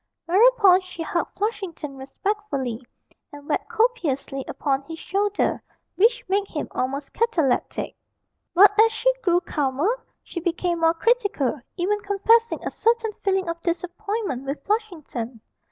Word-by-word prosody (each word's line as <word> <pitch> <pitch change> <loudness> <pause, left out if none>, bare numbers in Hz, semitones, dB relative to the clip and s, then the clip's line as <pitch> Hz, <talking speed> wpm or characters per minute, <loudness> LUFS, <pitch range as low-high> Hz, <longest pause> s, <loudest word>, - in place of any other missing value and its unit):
Whereupon 395 0 +6
she 360 -2 -7
hugged 340 +1 -2
Flushington 385 -9 -3
respectfully, 275 - -3 0.5
and 290 0 -12
wept - - -1
copiously 315 - 0
upon 275 -2 -1
his 325 - -6
shoulder, 405 +4 0 0.3
which 480 +5 +3
made 395 +1 +1
him 300 - -4
almost 275 +2 -3
cataleptic. 355 - 0 0.6
But 395 +3 +8
as 450 0 +5
she - - +2
grew 350 -3 +3
calmer, 310 - -1 0.2
she 345 - -6
became 345 0 -1
more 330 0 +3
critical, 405 - +1 0.2
even 400 +4 +1
confessing 440 +3 +2
a - - -2
certain 460 -1 +1
feeling 385 -2 +1
of 335 0 -4
disappointment 360 - -3
with 280 +2 -4
Flushington. 315 - -3
365 Hz, 130 wpm, -24 LUFS, 295-425 Hz, 0.6 s, But